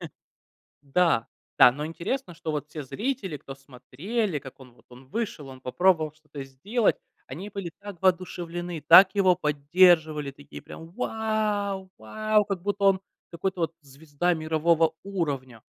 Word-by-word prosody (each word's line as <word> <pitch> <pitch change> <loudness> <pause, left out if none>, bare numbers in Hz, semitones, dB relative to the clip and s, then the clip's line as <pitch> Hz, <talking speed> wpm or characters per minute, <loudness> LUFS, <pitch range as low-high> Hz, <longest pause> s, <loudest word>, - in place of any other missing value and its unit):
Э, - - -6 0.8
да, 145 -4 +2 0.3
да, 125 - +8
но 150 +4 -5
интересно, 175 +6 -4
что, 160 - -5
вот, 150 0 -4
все 150 0 -7
зрители, 200 - -3
кто 135 -1 -10
смотрели, 150 - -4
как 135 -1 -13
он, 125 -2 -14
вот, - - -25
он 125 +1 -15
вышел, 170 - -4
он 130 -1 -11
попробовал 155 +3 +2
что-то 150 -2 -10
сделать. 195 - 0 0.3
Они 195 +5 -8
были 195 -5 -5
так 200 -4 -9
воодушевлены, 175 -2 -1
так 190 +1 +9
его 190 -3 +4
поддерживали, 155 -1 +3
такие 145 +1 -12
прям: 165 - -11
"Вау, 210 -4 -2
вау!" 215 - +1
Как 195 -3 -4
будто 200 +1 -2
он 195 -1 +4 0.3
какой-то, 180 +1 -3
вот, 165 - -1
звезда 145 +5 -2
мирового 160 0 +2
уровня. 140 - -4
170 Hz, 150 wpm, -26 LUFS, 145-195 Hz, 0.8 s, так